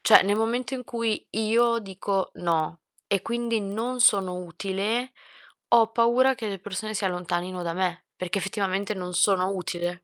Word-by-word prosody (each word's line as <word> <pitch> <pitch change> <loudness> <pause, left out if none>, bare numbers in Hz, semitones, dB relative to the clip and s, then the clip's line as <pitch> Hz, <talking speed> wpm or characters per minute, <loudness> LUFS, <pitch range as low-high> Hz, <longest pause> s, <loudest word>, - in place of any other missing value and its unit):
Cioè - - +7
nel 200 +2 +1
momento 235 +4 -1
in 250 -1 -5
cui 230 -2 -2
io 230 +2 +2
dico: 195 -1 -2
"No", 165 -1 -1 0.3
e 200 -2 +1
quindi 235 -1 -1
non 225 +6 -3
sono 195 -6 +4
utile, 195 +7 -2 0.6
ho 230 -2 +6
paura 240 +3 +3
che 225 - -5
le 195 -2 -4
persone 205 +3 -5
si 205 - -2
allontanino 180 0 -2
da 170 -1 -2
me 180 0 -1
perché 185 +3 -2
effettivamente 195 +1 -1
non 180 -2 -5
sono 185 0 +3
utile. 175 -2 -3
200 Hz, 160 wpm, -26 LUFS, 180-230 Hz, 0.6 s, Cioè